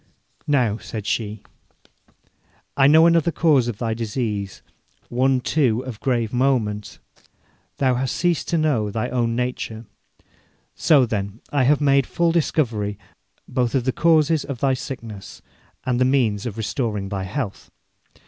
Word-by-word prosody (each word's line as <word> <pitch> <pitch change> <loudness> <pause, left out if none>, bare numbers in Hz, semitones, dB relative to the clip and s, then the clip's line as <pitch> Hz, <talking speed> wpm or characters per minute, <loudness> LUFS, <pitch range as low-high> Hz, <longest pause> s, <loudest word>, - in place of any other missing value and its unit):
'Now,' 120 -7 +1
said 105 -3 -7
she, 110 -1 -2 1.3
'I 135 -1 +5
know 160 +3 +7
another 170 -1 +3
cause 150 -8 +3
of 120 -4 -3
thy 115 -1 -2
disease, 110 -3 -3 0.5
one, 130 +1 +2
too, 125 -4 +1
of 120 -5 -7
grave 120 -4 -1
moment. 120 -5 0 0.8
Thou 130 -2 +2
hast 130 +1 -1
ceased 175 -3 0
to 170 - 0
know 140 -10 +1
thy 115 +4 -2
own 115 -2 0
nature. 120 -2 -3 0.9
So, 145 -5 +4
then, 100 -1 -4
I 140 -3 +2
have 150 +2 +3
made 140 -2 +3
full 170 -1 +1
discovery 115 - 0 0.5
both 125 0 -1
of 130 - +1
the 130 - +1
causes 160 0 +3
of 140 -4 -6
thy 135 0 +2
sickness 115 -7 -7 0.4
and 125 -1 0
the - - +4
means 120 -5 +1
of 110 -2 -6
restoring 110 -3 -2
thy 95 -2 -3
health. 105 0 -5
125 Hz, 145 wpm, -22 LUFS, 110-140 Hz, 1.3 s, know